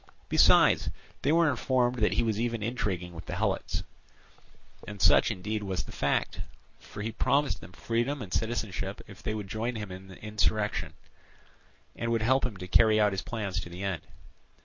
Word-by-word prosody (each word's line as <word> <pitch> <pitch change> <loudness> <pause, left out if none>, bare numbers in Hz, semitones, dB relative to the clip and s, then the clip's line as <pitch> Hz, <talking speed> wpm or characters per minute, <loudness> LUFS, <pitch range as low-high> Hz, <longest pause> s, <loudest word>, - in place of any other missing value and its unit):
Besides, - - +5 0.3
they 140 - +2
were 165 +1 +5
informed 125 -2 +1
that 105 - +3
he - - +2
was 110 -2 0
even 115 -2 -1
intriguing 95 -7 -2
with 80 - -9
the - - -3
Helots; - - -1 1.0
and 105 -1 -7
such 85 - +6
indeed 105 +4 -3
was 95 -3 -2
the - - -11
fact, 70 - 0 0.4
for 105 - -8
he 115 - -2
promised 140 +4 +1
them 90 - -11
freedom 120 +8 -1
and 95 - -8
citizenship 110 -4 -2
if - - -13
they 110 - -2
would 105 -2 -5
join 115 +4 -2
him 105 -3 -5
in 95 +1 -9
insurrection 105 +1 -1 1.0
and 115 0 -2
would 115 -1 +1
help 130 +2 +3
him 105 -6 -9
to 90 0 -7
carry 110 +3 +5
out 105 -1 +4
his 95 -1 -2
plans 100 -6 -3
to 85 - -6
the 90 +3 -7
end. 95 -5 -2
110 Hz, 180 wpm, -29 LUFS, 95-115 Hz, 1.0 s, such